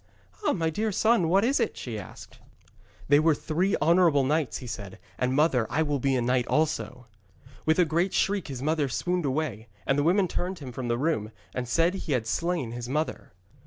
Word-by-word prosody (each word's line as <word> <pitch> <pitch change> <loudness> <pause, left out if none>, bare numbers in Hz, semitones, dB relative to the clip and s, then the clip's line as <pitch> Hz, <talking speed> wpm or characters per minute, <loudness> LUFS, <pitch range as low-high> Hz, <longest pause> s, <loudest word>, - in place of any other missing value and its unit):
'Ah, - - +2
my 165 -3 0
dear 215 +6 -1
son, 220 -4 +2
what 195 +5 +4
was 270 +4 +2
that?' 230 - -1
she 115 -4 -5
asked. 90 - -12 0.7
'They 145 +1 +6
were 155 0 +3
three 180 +7 0
honourable 165 -4 +4
knights,' 150 +1 0
he 130 - -9
said. 100 -5 -7 0.2
'And, 125 +1 +1
mother, 135 -6 +3
I 160 - +1
will 145 -2 -1
be 135 +1 +1
a 125 - +1
knight 125 0 +1
also.' 150 -5 -1 0.6
With 160 - +4
a 180 - +5
great 170 +4 0
shriek 200 -1 0
his 135 -3 -6
mother 155 -2 +1
swooned 180 +5 -1
away, 130 -6 -2 0.2
and 135 +1 +2
the - - +2
women 185 +4 +3
turned 180 +2 -3
him 135 -5 -8
from 125 0 -5
the 120 0 0
room 135 -7 -1 0.2
and 125 -1 -3
said 165 +8 +2
he 185 -6 -3
had 120 -4 0
slain 165 0 -1
his 120 0 -6
mother. 155 +4 -3
150 Hz, 205 wpm, -27 LUFS, 125-170 Hz, 0.7 s, They